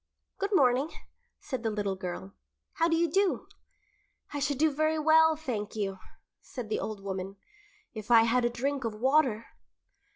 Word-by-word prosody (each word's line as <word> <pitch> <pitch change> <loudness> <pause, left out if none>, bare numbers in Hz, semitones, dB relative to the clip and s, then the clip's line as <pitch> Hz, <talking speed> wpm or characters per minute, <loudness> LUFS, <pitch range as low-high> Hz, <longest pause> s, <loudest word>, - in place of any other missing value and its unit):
"Good 400 +1 -1
morning," 265 0 +3 0.5
said 260 -4 -5
the 225 - -1
little 205 -2 -2
girl. 175 - -6 0.4
"How 330 - +2
do 330 - +2
you 340 +1 +2
do?" 385 +4 +1 0.9
"I 290 - -2
should 285 -1 0
do 310 +2 +3
very 310 +2 +1
well, 320 +1 +5
thank 240 -10 -4
you," 195 -3 -3 0.4
said 245 -5 -8
the - - -1
old 210 -2 -5
woman, 190 0 -5 0.6
"if 215 -1 -8
I 230 -1 +7
had 240 +2 +2
a 240 - +2
drink 265 +3 -2
of 225 -2 -3
water." 250 -2 +2
250 Hz, 165 wpm, -29 LUFS, 215-310 Hz, 0.9 s, I